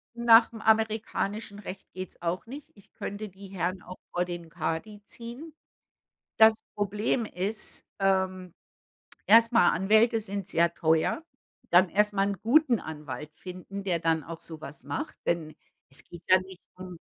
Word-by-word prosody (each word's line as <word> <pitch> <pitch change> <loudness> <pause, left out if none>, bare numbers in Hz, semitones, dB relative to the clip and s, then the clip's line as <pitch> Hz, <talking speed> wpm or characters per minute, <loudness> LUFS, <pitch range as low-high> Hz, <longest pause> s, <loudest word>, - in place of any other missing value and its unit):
Nach'm 230 -1 +5
amerikanischen 220 -1 0
Recht 195 -1 -9
geht's 185 -1 -8
auch 175 +2 -2
nicht. 275 +5 -9
Ich 200 - -21
könnte 205 +1 -6
die 195 +1 -12
Herren 185 -1 -3
auch 185 +1 -10 0.2
vor 180 0 +1
den 175 -2 -7
Kadi 205 +7 -4
ziehen. 245 +10 -9 0.8
Das 220 0 +6
Problem 210 +4 0
ist, 210 +2 -3
ähm, 190 -2 0 0.7
erstmal 230 -3 +6
Anwälte 220 +5 +3
sind 200 -3 -5
sehr 170 0 +2
teuer, 160 - +1 0.5
dann 180 +2 +6
erstmal 205 +1 +2
'n 200 -2 -3
guten 255 +1 +4
Anwalt 150 -2 -7
finden, 185 +2 -8
der 185 -3 0
dann 160 -1 +1
auch 165 +1 -8
sowas 155 -3 -9
macht, 145 0 -4
denn 160 -2 -1 0.3
es 135 +2 -7
geht 170 -1 -12
ja 185 - +8
nicht 185 -1 -12 0.2
um 185 -2 -9
195 Hz, 145 wpm, -28 LUFS, 175-220 Hz, 0.8 s, ja